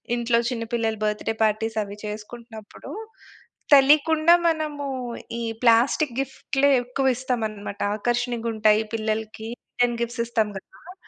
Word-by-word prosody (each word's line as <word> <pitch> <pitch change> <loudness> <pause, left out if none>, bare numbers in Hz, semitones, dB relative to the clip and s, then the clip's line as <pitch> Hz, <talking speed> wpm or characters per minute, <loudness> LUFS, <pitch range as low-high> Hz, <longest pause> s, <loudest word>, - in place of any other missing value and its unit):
ఇంట్లో 235 0 +1
చిన్న 230 -2 -3
పిల్లల 225 -2 0
బర్త్‌‌డే 210 +1 -1
పార్టీస్ 220 +1 0
అవి 200 0 -9
చేసుకుంటున్నప్పుడు, 220 +1 -9 0.8
తెలియకుండా 310 +4 +6
మనము 305 -3 -1 0.5
ఈ - - -2 0.2
ప్లాస్టిక్కు 240 +3 +3
గిఫ్ట్‌లే 270 +1 0
ఎక్కువ 260 +1 0
ఇస్తామనమాట 220 -6 -3 0.2
ఆకర్షణీయంగుంటాయి 230 -2 +1
పిల్లలకి 220 0 -3 0.2
రిటర్న్ 240 -1 0
గిఫ్ట్స్ 235 0 -3
ఇస్తాం 220 -3 0
గదా! 355 - -13
235 Hz, 110 wpm, -24 LUFS, 220-265 Hz, 0.8 s, తెలియకుండా